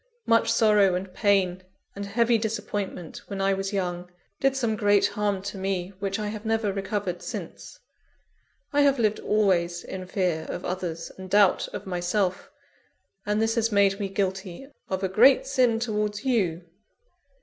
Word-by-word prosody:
Much 230 0 +3
sorrow 210 -5 +4
and 185 0 -5
pain 190 -3 +2 0.3
and 200 0 -5
heavy 235 +3 +2
disappointment, 205 -5 -4
when 200 -1 -5
I 195 0 +2
was 195 +1 -3
young, 180 -3 -3 0.3
did 270 0 +2
some 235 -5 0
great 205 -2 +3
harm 205 -2 -1
to 200 -1 -5
me 190 -1 -2
which 195 -1 -2
I 210 -1 -3
have 210 0 -6
never 220 -2 0
recovered 195 -2 -3
since. - - -7 1.0
I 290 - +4
have 280 -1 +4
lived 215 -3 +1
always 175 -5 +1
in 185 -1 -7
fear 180 -4 -1
of - - -5
others, 175 -2 -4
and 190 0 -8
doubt 200 -1 +4
of - - -7
myself; 180 +1 -1 0.8
and 210 +1 +1
this 225 0 +1
has 230 -1 +1
made 200 -1 +3
me 200 -1 -2
guilty 190 +2 -3 0.2
of 190 0 -2
a - - +2
great 245 +9 +5
sin 255 -4 +2
towards 210 -2 -2
_you. 190 -10 0
200 Hz, 160 wpm, -26 LUFS, 185-220 Hz, 1.0 s, great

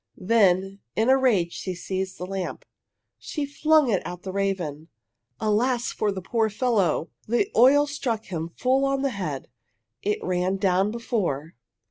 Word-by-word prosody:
Then 195 -2 +2 0.2
in 225 +3 +2
a 265 - +7
rage 200 -10 +2
she 185 -1 -4
seized 190 +1 -4
the 180 - -5
lamp. 190 -1 -5 0.5
She 295 -2 -3
flung 300 -1 +3
it 195 - +2
at 180 0 -7
the 190 - -4
raven. 185 -6 -2 0.5
Alas, 240 +4 +1
for 210 - 0
the 190 -2 -5
poor 225 +1 +1
fellow! 210 -8 +1 0.2
The 240 - +1
oil 275 +5 +6
struck 255 -7 -3
him 165 -3 -4
full 260 +2 +2
on 275 0 +1
the 275 - +1
head. 155 - -4 0.5
It 210 +1 0
ran 185 +1 0
down 190 0 +2
before. 205 - -2
200 Hz, 155 wpm, -25 LUFS, 185-250 Hz, 0.5 s, a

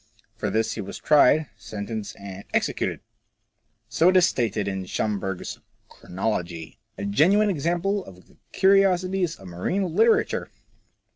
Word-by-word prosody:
For - - -3
this 110 0 0
he - - -5
was 100 - -7
tried, 150 0 +4
sentenced, 105 0 -6
and 100 0 -8
executed! - - -1 0.9
So 160 +9 +3
it 185 - +4
is 180 - +6
stated 110 -8 -1
in 95 -1 -3
Schomberg's 95 -3 -3
" - - -42
Chronology." 90 -4 -4 0.2
A 100 - -4
genuine 190 - +3
example 175 +5 -1
of 90 -1 -15
the - - -24
curiosities 190 -2 +3
of 95 - -13
marine 165 - -2
literature 225 +3 +2
120 Hz, 135 wpm, -24 LUFS, -, 0.9 s, is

